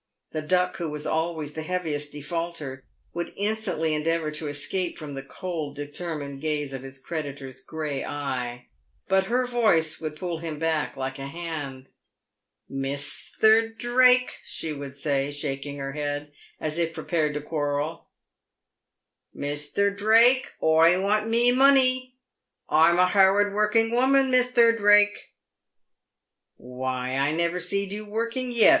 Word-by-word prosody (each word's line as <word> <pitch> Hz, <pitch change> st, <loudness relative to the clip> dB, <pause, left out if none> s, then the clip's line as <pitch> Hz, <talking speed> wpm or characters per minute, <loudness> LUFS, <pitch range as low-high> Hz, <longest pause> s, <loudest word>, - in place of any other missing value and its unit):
The 155 Hz, -, -3 dB
Duck, 180 Hz, +3 st, +1 dB
who 170 Hz, -2 st, -3 dB
was 150 Hz, 0 st, -5 dB
always 160 Hz, -2 st, -2 dB
the 160 Hz, -, -5 dB
heaviest 155 Hz, -4 st, -3 dB
defaulter, 145 Hz, -3 st, -5 dB, 0.3 s
would 170 Hz, 0 st, -4 dB
instantly 200 Hz, -6 st, -1 dB
endeavour 155 Hz, 0 st, -1 dB
to 150 Hz, 0 st, -5 dB
escape 170 Hz, +5 st, -2 dB
from 150 Hz, -3 st, -7 dB
the 135 Hz, -, -5 dB
cold, 155 Hz, 0 st, -6 dB
determined 145 Hz, -1 st, -6 dB
gaze 150 Hz, -3 st, -2 dB
of 135 Hz, -, -5 dB
his 135 Hz, 0 st, -9 dB
creditor's 140 Hz, -3 st, -6 dB
grey 150 Hz, -1 st, -4 dB
eye; 125 Hz, -4 st, -5 dB, 0.4 s
but 190 Hz, 0 st, +2 dB
her 250 Hz, +2 st, +1 dB
voice 210 Hz, -11 st, +1 dB
would 155 Hz, -1 st, -5 dB
pull 170 Hz, 0 st, -4 dB
him 165 Hz, -2 st, -5 dB
back 160 Hz, -1 st, -1 dB
like 135 Hz, +1 st, -4 dB
a 135 Hz, -, -5 dB
hand. 145 Hz, -5 st, -6 dB, 0.8 s
"Misther 145 Hz, +11 st, +2 dB
Drake 250 Hz, +2 st, +3 dB
!" -, -, -28 dB
she 160 Hz, -, -5 dB
would 140 Hz, -2 st, -8 dB
say, 140 Hz, -1 st, -1 dB
shaking 145 Hz, -1 st, -5 dB
her 135 Hz, 0 st, -5 dB
head 145 Hz, 0 st, -4 dB, 0.3 s
as 155 Hz, +1 st, -2 dB
if 165 Hz, -1 st, -1 dB
prepared 155 Hz, -4 st, -1 dB
to 150 Hz, -, -3 dB
quarrel 145 Hz, 0 st, -3 dB, 0.4 s
— -, -, -59 dB
" -, -, -58 dB
Misther 145 Hz, +8 st, 0 dB
Drake, 230 Hz, +6 st, +4 dB
oi 165 Hz, +3 st, +5 dB
want 210 Hz, +3 st, +1 dB
mee 235 Hz, +2 st, +6 dB
monee. 255 Hz, -1 st, +4 dB, 0.6 s
Oi'm 160 Hz, +3 st, +5 dB
a 180 Hz, -, +5 dB
harrud 200 Hz, +1 st, +4 dB
worrucking 215 Hz, +2 st, +2 dB
woman, 265 Hz, +2 st, +3 dB
Misther 250 Hz, -2 st, +4 dB
Drake." 205 Hz, -1 st, +3 dB, 1.2 s
"Why, 130 Hz, +1 st, -4 dB
I 140 Hz, +2 st, +1 dB
never 170 Hz, +2 st, 0 dB
seed 200 Hz, +2 st, -2 dB
you 210 Hz, +1 st, -5 dB
working 230 Hz, +4 st, -2 dB
vet!" 230 Hz, +5 st, +7 dB
160 Hz, 145 wpm, -25 LUFS, 145-205 Hz, 1.2 s, vet